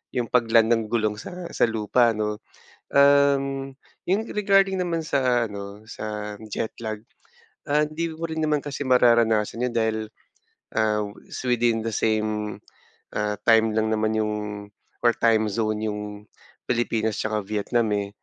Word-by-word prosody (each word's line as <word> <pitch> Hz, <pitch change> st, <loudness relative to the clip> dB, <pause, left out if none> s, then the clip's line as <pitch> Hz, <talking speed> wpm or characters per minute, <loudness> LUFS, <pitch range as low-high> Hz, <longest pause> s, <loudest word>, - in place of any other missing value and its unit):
yung 125 Hz, -, +1 dB
pag-land 115 Hz, -1 st, +3 dB
ng 115 Hz, -1 st, +1 dB
gulong 110 Hz, -2 st, 0 dB
sa 180 Hz, -1 st, -8 dB
sa -, -, +3 dB
lupa, 115 Hz, +2 st, +2 dB
'no? 105 Hz, 0 st, -2 dB, 0.5 s
Uhm, 140 Hz, -1 st, +3 dB, 0.3 s
yung 195 Hz, +4 st, +2 dB
regarding 195 Hz, -2 st, +3 dB
naman 165 Hz, -2 st, -1 dB
sa 125 Hz, -5 st, +2 dB
ano, 100 Hz, +1 st, -8 dB
sa 105 Hz, -1 st, -6 dB
jet 110 Hz, +2 st, -3 dB
lag, 110 Hz, -1 st, -5 dB, 0.6 s
ah 150 Hz, +1 st, +3 dB
hindi 155 Hz, +3 st, -2 dB
mo 165 Hz, -, -9 dB
rin 160 Hz, 0 st, -4 dB
naman 150 Hz, -2 st, +1 dB
kasi 145 Hz, -1 st, -4 dB
mararanasan 115 Hz, -2 st, +3 dB
yun 120 Hz, -, -5 dB
dahil, 110 Hz, -1 st, +1 dB, 0.8 s
ah, 110 Hz, -1 st, +1 dB, 0.3 s
s -, -, -6 dB
within 120 Hz, -2 st, +2 dB
the 115 Hz, -, -2 dB
same, 110 Hz, -1 st, -1 dB, 0.6 s
ah, 105 Hz, 0 st, 0 dB, 0.2 s
time 110 Hz, -1 st, +5 dB
lang 110 Hz, 0 st, +1 dB
naman 110 Hz, 0 st, 0 dB
yung 105 Hz, -1 st, 0 dB, 0.7 s
or 120 Hz, -, +6 dB
time 110 Hz, -1 st, +3 dB
zone 110 Hz, 0 st, -1 dB
yung 105 Hz, 0 st, -4 dB, 0.7 s
Pilipinas 115 Hz, -3 st, 0 dB
'tsaka 110 Hz, -1 st, -1 dB
Vietnam 110 Hz, +2 st, 0 dB
eh. 100 Hz, -1 st, -1 dB
115 Hz, 145 wpm, -24 LUFS, 110-135 Hz, 0.8 s, or